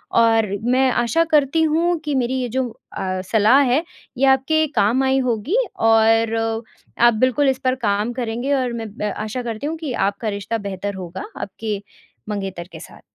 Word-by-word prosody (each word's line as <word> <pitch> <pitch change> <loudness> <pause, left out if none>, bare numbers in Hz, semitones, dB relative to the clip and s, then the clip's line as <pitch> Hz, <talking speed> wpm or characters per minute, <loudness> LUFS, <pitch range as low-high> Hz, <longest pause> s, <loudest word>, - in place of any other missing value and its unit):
और 225 -1 +4 0.2
मैं 255 +2 +3
आशा 240 +7 +2
करती 300 +1 +3
हूँ 335 +3 +2
कि 295 -2 -1
मेरी 255 -1 0
ये 245 - -3
जो 260 +2 -1 0.3
अ, 185 0 -2
सलाह 220 +6 +4
है, 285 +6 +2 0.3
ये 270 - +3
आपके 270 +4 +3
काम 235 +7 +3
आई 265 0 +2
होगी 255 - 0 0.2
और 225 0 +3 0.6
आप 240 0 +6
बिल्कुल 255 +5 +2
इस 265 - -1
पर 255 0 +2
काम 205 +3 0
करेंगे 240 +2 -2
और 255 -3 0
मैं 230 -1 -4
मैं 210 -1 -2
आशा 220 +4 -4
करती 230 +3 -4
हूँ 325 +2 -3
कि 310 -5 -4 0.2
आपका 205 +3 -6
रिश्ता 205 +2 -3
बेहतर 200 +1 -4
होगा 185 0 -7 0.2
आपके 205 +1 -4 0.5
मंगेतर 195 -4 -4
के - - -9
साथ। - - -13
240 Hz, 180 wpm, -21 LUFS, 210-265 Hz, 0.6 s, आप